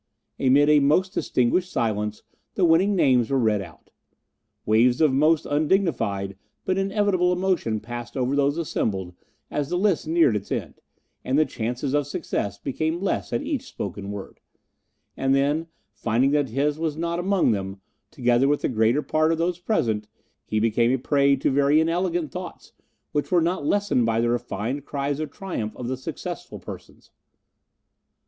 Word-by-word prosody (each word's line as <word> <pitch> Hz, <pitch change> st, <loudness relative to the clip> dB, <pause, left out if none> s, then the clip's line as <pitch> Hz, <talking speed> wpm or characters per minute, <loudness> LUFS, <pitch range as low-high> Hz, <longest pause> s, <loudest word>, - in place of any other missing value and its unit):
Amid 140 Hz, +2 st, +4 dB
a 150 Hz, 0 st, +6 dB
most 155 Hz, +7 st, +2 dB
distinguished 180 Hz, +8 st, +1 dB
silence 105 Hz, -, -2 dB, 0.3 s
the 185 Hz, -, +3 dB
winning 180 Hz, +5 st, +4 dB
names 125 Hz, -9 st, +3 dB
were 135 Hz, -, +1 dB
read 110 Hz, -5 st, +2 dB
out. 85 Hz, -5 st, -13 dB, 0.7 s
Waves 120 Hz, +3 st, +3 dB
of 155 Hz, -4 st, +4 dB
most 155 Hz, +3 st, +3 dB
undignified 145 Hz, -, 0 dB, 0.3 s
but 185 Hz, +1 st, 0 dB
inevitable 195 Hz, -2 st, +1 dB
emotion 180 Hz, -, 0 dB
passed 120 Hz, +3 st, -7 dB
over 130 Hz, +2 st, 0 dB
those 140 Hz, +1 st, +2 dB
assembled 95 Hz, -, -2 dB, 0.4 s
as 145 Hz, -1 st, -2 dB
the 175 Hz, -, 0 dB
list 190 Hz, -4 st, +1 dB
neared 160 Hz, -8 st, +3 dB
its 100 Hz, -1 st, -5 dB
end, -, -, -4 dB, 0.4 s
and 130 Hz, +2 st, 0 dB
the 155 Hz, -, +4 dB
chances 125 Hz, +4 st, -3 dB
of 145 Hz, -1 st, +1 dB
success 100 Hz, -7 st, -3 dB
became 160 Hz, +5 st, -2 dB
less 195 Hz, 0 st, -2 dB
at 240 Hz, -, -1 dB
each 280 Hz, -3 st, -3 dB
spoken 100 Hz, +1 st, -6 dB
word; 100 Hz, -1 st, -8 dB, 0.8 s
and 135 Hz, 0 st, +1 dB
then, 145 Hz, +4 st, +1 dB, 0.3 s
finding 120 Hz, +4 st, +1 dB
that 145 Hz, -3 st, +1 dB
his 145 Hz, +5 st, 0 dB
was 160 Hz, -2 st, -2 dB
not 170 Hz, +1 st, -2 dB
among 190 Hz, -5 st, +2 dB
them, 95 Hz, -2 st, -3 dB, 0.3 s
together 120 Hz, +2 st, +2 dB
with 145 Hz, +1 st, +1 dB
the -, -, +1 dB
greater 115 Hz, +4 st, +2 dB
part 155 Hz, +1 st, +2 dB
of 165 Hz, -, 0 dB
those 175 Hz, +1 st, -1 dB
present, 110 Hz, -, 0 dB, 0.4 s
he 110 Hz, -, 0 dB
became 115 Hz, +2 st, +2 dB
a 130 Hz, -, +2 dB
prey 140 Hz, +1 st, +3 dB
to 135 Hz, -, 0 dB
very 140 Hz, +2 st, +4 dB
inelegant 170 Hz, -1 st, 0 dB
thoughts, -, -, -8 dB, 0.4 s
which 145 Hz, +4 st, -2 dB
were 180 Hz, -, +5 dB
not 170 Hz, -2 st, -1 dB
lessened 200 Hz, -, +2 dB
by 115 Hz, 0 st, +1 dB
the 120 Hz, 0 st, +1 dB
refined 120 Hz, +2 st, -2 dB
cries 140 Hz, 0 st, -3 dB
of 155 Hz, -, -3 dB
triumph 170 Hz, -, -5 dB
of 125 Hz, -, -5 dB
the 130 Hz, -, -1 dB
successful 130 Hz, -, -7 dB
persons. -, -, -11 dB
140 Hz, 165 wpm, -24 LUFS, 120-165 Hz, 0.8 s, a